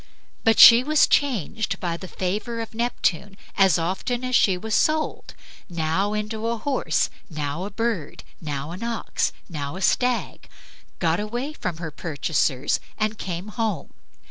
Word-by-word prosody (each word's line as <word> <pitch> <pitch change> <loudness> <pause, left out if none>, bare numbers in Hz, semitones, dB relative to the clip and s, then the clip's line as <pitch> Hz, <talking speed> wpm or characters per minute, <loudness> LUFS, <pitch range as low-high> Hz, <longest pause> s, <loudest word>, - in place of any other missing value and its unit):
But 225 0 +4
she 235 +1 +10
was 305 +2 +4
changed 220 - 0
by 170 -2 -2
the 185 +2 -8
favor 210 +7 -3
of 225 -1 -6
Neptune 205 -4 -1 0.2
as 195 -5 +5
often 190 +9 -2
as 255 0 0
she 190 -6 +4
was 220 +4 -5
sold, 310 0 0 0.3
now 170 +4 0
into 215 +1 -3
a 235 0 -1
horse, 275 +3 0 0.2
now 155 +2 -3
a - - -4
bird, 215 -7 -3 0.2
now 145 -1 -4
an 180 +4 -7
ox, 235 -1 -1 0.2
and 175 - -15
now 145 0 -4
a 190 - -6
stag, 250 -1 0 0.5
got 165 0 +1
away 240 +8 -3
from 180 - -4
her 165 -2 -5
purchasers 145 -3 0 0.2
and 215 0 -1
came 180 +2 -4
home. 215 -6 -3
205 Hz, 155 wpm, -24 LUFS, 170-230 Hz, 0.5 s, she